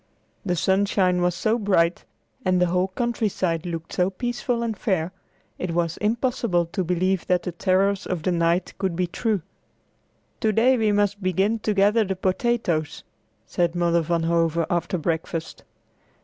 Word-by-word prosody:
The 180 Hz, -4 st, 0 dB
sunshine 190 Hz, 0 st, +2 dB
was 175 Hz, 0 st, +1 dB
so 220 Hz, +6 st, +1 dB
bright, 180 Hz, -5 st, +1 dB, 0.4 s
and 185 Hz, -3 st, +2 dB
the 180 Hz, -, +4 dB
whole 180 Hz, +2 st, +1 dB
countryside 190 Hz, -6 st, -1 dB
looked 165 Hz, -1 st, -5 dB
so 180 Hz, +1 st, +2 dB
peaceful 240 Hz, +3 st, -2 dB
and 225 Hz, -2 st, -2 dB
fair, 185 Hz, -6 st, -1 dB, 0.5 s
it 170 Hz, -2 st, -3 dB
was 170 Hz, -1 st, 0 dB
impossible 220 Hz, -5 st, 0 dB
to 175 Hz, +3 st, -3 dB
believe 180 Hz, +1 st, 0 dB
that 180 Hz, -1 st, +2 dB
the 180 Hz, -, -3 dB
terrors 190 Hz, +3 st, +1 dB
of 175 Hz, -4 st, -3 dB
the 185 Hz, -, +1 dB
night 170 Hz, +1 st, +1 dB
could 190 Hz, -3 st, -1 dB
be 180 Hz, +1 st, +1 dB
true. 200 Hz, +1 st, -1 dB, 1.0 s
"To 220 Hz, -, +2 dB
day 240 Hz, +5 st, +4 dB
we 220 Hz, -3 st, +2 dB
must 205 Hz, 0 st, +1 dB
begin 195 Hz, +4 st, +1 dB
to 215 Hz, -1 st, -1 dB
gather 205 Hz, +3 st, +4 dB
the 190 Hz, -2 st, -2 dB
potatoes," 185 Hz, -4 st, -1 dB, 0.4 s
said 175 Hz, -1 st, 0 dB
Mother 170 Hz, -1 st, +2 dB
Van 165 Hz, +1 st, 0 dB
Hove 165 Hz, 0 st, +1 dB
after 175 Hz, +2 st, 0 dB
breakfast. 160 Hz, 0 st, -3 dB
185 Hz, 160 wpm, -24 LUFS, 170-205 Hz, 1.0 s, the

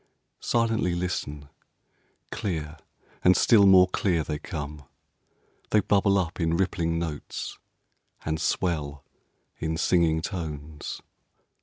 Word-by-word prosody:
Silently 115 Hz, -6 st, +1 dB
listen! 75 Hz, -5 st, -3 dB, 0.8 s
Clear, 80 Hz, -5 st, -3 dB, 0.5 s
and 90 Hz, +1 st, +6 dB
still 105 Hz, -4 st, +6 dB
more 95 Hz, -1 st, +7 dB
clear, 90 Hz, -3 st, 0 dB
they 75 Hz, -1 st, -4 dB
come. 75 Hz, -1 st, -6 dB, 0.9 s
They 105 Hz, -, +4 dB
bubble 100 Hz, -1 st, +3 dB
up 90 Hz, -2 st, -2 dB
in 85 Hz, 0 st, +1 dB
rippling 85 Hz, -3 st, 0 dB
notes, 80 Hz, -3 st, -5 dB, 0.7 s
and 80 Hz, +1 st, -1 dB
swell 75 Hz, -5 st, -1 dB, 0.5 s
in 80 Hz, 0 st, -2 dB
singing 80 Hz, -1 st, +2 dB
tones. 75 Hz, -5 st, -6 dB
85 Hz, 105 wpm, -26 LUFS, 75-95 Hz, 0.9 s, more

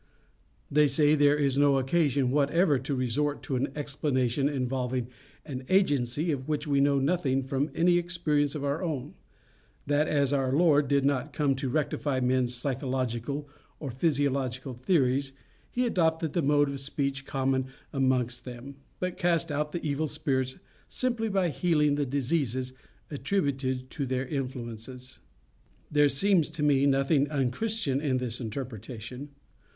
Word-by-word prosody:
They 150 Hz, +1 st, +5 dB
say 150 Hz, +1 st, +3 dB
there 145 Hz, -1 st, +4 dB
is 140 Hz, -2 st, +1 dB
no 145 Hz, -1 st, +5 dB
occasion 135 Hz, -2 st, +1 dB
whatever 145 Hz, +1 st, +3 dB
to 135 Hz, +2 st, -3 dB
resort 140 Hz, +4 st, -1 dB
to 135 Hz, -, -2 dB
an 130 Hz, +2 st, -1 dB
explanation 140 Hz, -2 st, 0 dB
involving 125 Hz, -2 st, -2 dB, 0.4 s
an 130 Hz, -4 st, -6 dB
agency 150 Hz, -5 st, +2 dB
of 135 Hz, -2 st, -3 dB
which 150 Hz, 0 st, -1 dB
we 140 Hz, -2 st, +2 dB
know 140 Hz, 0 st, +3 dB
nothing 135 Hz, -2 st, +1 dB
from 135 Hz, +3 st, -1 dB
any 175 Hz, +1 st, +4 dB
experience 160 Hz, -4 st, 0 dB
of 145 Hz, -, -4 dB
our 140 Hz, +4 st, -1 dB
own; 155 Hz, -8 st, -3 dB, 0.7 s
that, 145 Hz, +2 st, +2 dB
as 140 Hz, -2 st, +1 dB
our 135 Hz, -2 st, +1 dB
Lord 150 Hz, -1 st, +4 dB
did 140 Hz, 0 st, +2 dB
not 140 Hz, +1 st, 0 dB
come 145 Hz, -3 st, +2 dB
to 135 Hz, 0 st, -3 dB
rectify 145 Hz, -1 st, -1 dB
men's 125 Hz, -1 st, +1 dB
psychological 130 Hz, +1 st, -2 dB, 0.3 s
or 140 Hz, -4 st, -5 dB
physiological 135 Hz, -2 st, -1 dB
theories, 135 Hz, 0 st, +1 dB, 0.4 s
he 250 Hz, +1 st, 0 dB
adopted 160 Hz, -7 st, +1 dB
the 170 Hz, -, +1 dB
mode 145 Hz, 0 st, +3 dB
of 140 Hz, -1 st, -4 dB
speech 140 Hz, 0 st, -2 dB
common 130 Hz, -1 st, 0 dB, 0.3 s
amongst 125 Hz, -3 st, 0 dB
them, 125 Hz, +2 st, -9 dB, 0.2 s
but 180 Hz, 0 st, -3 dB
cast 170 Hz, -2 st, +1 dB
out 150 Hz, +1 st, -1 dB
the 170 Hz, -, -4 dB
evil 150 Hz, +2 st, 0 dB
spirits 135 Hz, -4 st, -1 dB, 0.3 s
simply 235 Hz, -3 st, -1 dB
by 190 Hz, -3 st, +1 dB
healing 150 Hz, -3 st, +2 dB
the 145 Hz, -1 st, 0 dB
diseases 130 Hz, -2 st, -1 dB, 0.4 s
attributed 135 Hz, -5 st, -1 dB
to 140 Hz, -4 st, -3 dB
their 130 Hz, +1 st, -1 dB
influences. 125 Hz, -2 st, -6 dB, 0.7 s
There 145 Hz, -1 st, +4 dB
seems 170 Hz, +2 st, +2 dB
to 150 Hz, -, -1 dB
me 140 Hz, -1 st, +4 dB
nothing 135 Hz, +1 st, +2 dB
unchristian 140 Hz, -, -1 dB
in 135 Hz, -4 st, +1 dB
this 125 Hz, -1 st, -1 dB
interpretation. 120 Hz, +2 st, -6 dB
140 Hz, 145 wpm, -28 LUFS, 130-150 Hz, 0.7 s, They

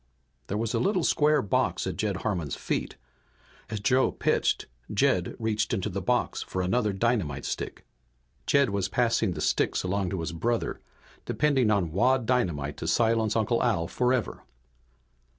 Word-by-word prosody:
There 100 Hz, -, -2 dB
was 115 Hz, 0 st, -2 dB
a -, -, +1 dB
little 190 Hz, -3 st, +1 dB
square 150 Hz, 0 st, +3 dB
box 100 Hz, -, 0 dB
at -, -, -3 dB
Jed -, -, -1 dB
Harmon's 85 Hz, -, -1 dB
feet. -, -, -3 dB, 0.7 s
As 110 Hz, -1 st, -3 dB
Joe 130 Hz, +5 st, +3 dB
pitched -, -, 0 dB, 0.3 s
Jed -, -, +1 dB
reached 110 Hz, -2 st, 0 dB
into 95 Hz, +2 st, -2 dB
the 100 Hz, 0 st, -3 dB
box 125 Hz, +7 st, 0 dB
for 95 Hz, -, -3 dB
another 105 Hz, +4 st, +1 dB
dynamite 95 Hz, -, -1 dB
stick. -, -, -5 dB, 0.6 s
Jed 140 Hz, -5 st, +3 dB
was 100 Hz, -2 st, -1 dB
passing 115 Hz, -3 st, +1 dB
the 75 Hz, -, -5 dB
sticks -, -, +1 dB
along 95 Hz, 0 st, -1 dB
to 95 Hz, -3 st, -3 dB
his 80 Hz, +2 st, -3 dB
brother, 115 Hz, +8 st, -1 dB, 0.5 s
depending 135 Hz, -6 st, +2 dB
on 100 Hz, -6 st, +1 dB
wad 125 Hz, +7 st, +2 dB
dynamite 85 Hz, -, 0 dB
to -, -, -5 dB
silence 115 Hz, -2 st, +2 dB
Uncle 115 Hz, +1 st, +1 dB
Al 105 Hz, -9 st, +1 dB
forever. 125 Hz, -1 st, 0 dB
110 Hz, 155 wpm, -27 LUFS, 95-125 Hz, 0.7 s, square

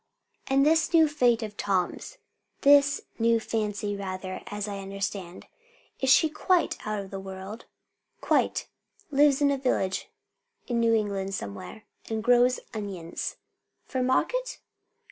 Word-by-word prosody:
"And 275 Hz, +1 st, +3 dB
this 320 Hz, +2 st, +3 dB
new 320 Hz, -1 st, +7 dB
Fate 245 Hz, -6 st, +2 dB
of 210 Hz, -1 st, -6 dB
Tom's 195 Hz, -, -1 dB, 0.4 s
this 285 Hz, 0 st, +5 dB, 0.2 s
new 230 Hz, 0 st, +3 dB
Fancy 210 Hz, -2 st, -2 dB
rather, 185 Hz, -1 st, -5 dB
as 205 Hz, 0 st, -4 dB
I 200 Hz, -1 st, -5 dB
understand, 195 Hz, -2 st, -5 dB, 0.6 s
she 265 Hz, +4 st, +6 dB
is 310 Hz, -, -12 dB
quite 360 Hz, +2 st, +2 dB
out 215 Hz, -1 st, -1 dB
of 195 Hz, -, -10 dB
the 195 Hz, -, -5 dB
world?" 190 Hz, +3 st, -8 dB, 0.5 s
"Quite. -, -, +1 dB, 0.4 s
Lives 285 Hz, 0 st, +4 dB
in 280 Hz, -, +4 dB
a 275 Hz, -, -1 dB
village 195 Hz, -8 st, -1 dB, 0.6 s
in 240 Hz, -2 st, -1 dB
New 230 Hz, -1 st, +4 dB
England 195 Hz, -2 st, -1 dB
somewhere, 100 Hz, -, -7 dB, 0.3 s
and 220 Hz, -1 st, -2 dB
grows 245 Hz, +1 st, +4 dB
onions." 195 Hz, -6 st, -5 dB, 0.5 s
"For 260 Hz, -, -2 dB
market?" -, -, 0 dB
220 Hz, 135 wpm, -27 LUFS, 195-270 Hz, 0.6 s, new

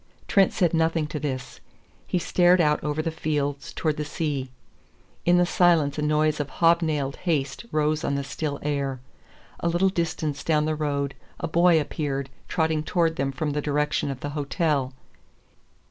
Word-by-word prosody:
Trent 195 Hz, -2 st, +4 dB
said 175 Hz, -3 st, +1 dB
nothing 165 Hz, -1 st, +2 dB
to 150 Hz, -, -4 dB
this. 135 Hz, -3 st, -4 dB, 0.5 s
He -, -, 0 dB
stared 180 Hz, +1 st, +4 dB
out 150 Hz, -2 st, +2 dB
over 150 Hz, +1 st, -1 dB
the 165 Hz, -, -1 dB
fields 145 Hz, -3 st, -2 dB
towards 155 Hz, -2 st, -1 dB
the -, -, 0 dB
sea. 145 Hz, -3 st, -3 dB, 0.8 s
In 175 Hz, 0 st, +5 dB
the 175 Hz, -, +4 dB
silence 165 Hz, -5 st, +3 dB
a -, -, 0 dB
noise 150 Hz, 0 st, +2 dB
of 145 Hz, -1 st, -2 dB
hobnailed 160 Hz, -5 st, +2 dB
haste 160 Hz, +5 st, -2 dB
rose 155 Hz, +1 st, +1 dB
on 140 Hz, -, 0 dB
the 140 Hz, -, -1 dB
still 145 Hz, +1 st, -3 dB
air. 140 Hz, -3 st, -1 dB, 0.6 s
A -, -, -1 dB
little 175 Hz, +3 st, +3 dB
distance 160 Hz, -5 st, -2 dB
down 150 Hz, -2 st, +2 dB
the 155 Hz, -, 0 dB
road 140 Hz, -2 st, -1 dB, 0.3 s
a -, -, -2 dB
boy 170 Hz, 0 st, +4 dB
appeared 140 Hz, -3 st, -3 dB, 0.2 s
trotting 160 Hz, -2 st, +1 dB
towards 165 Hz, +1 st, +1 dB
them 135 Hz, 0 st, 0 dB
from 145 Hz, +3 st, -2 dB
the 150 Hz, +1 st, -1 dB
direction 150 Hz, 0 st, 0 dB
of 135 Hz, -2 st, -5 dB
the 145 Hz, -, -3 dB
hotel. 145 Hz, -2 st, 0 dB
150 Hz, 170 wpm, -25 LUFS, 145-165 Hz, 0.8 s, In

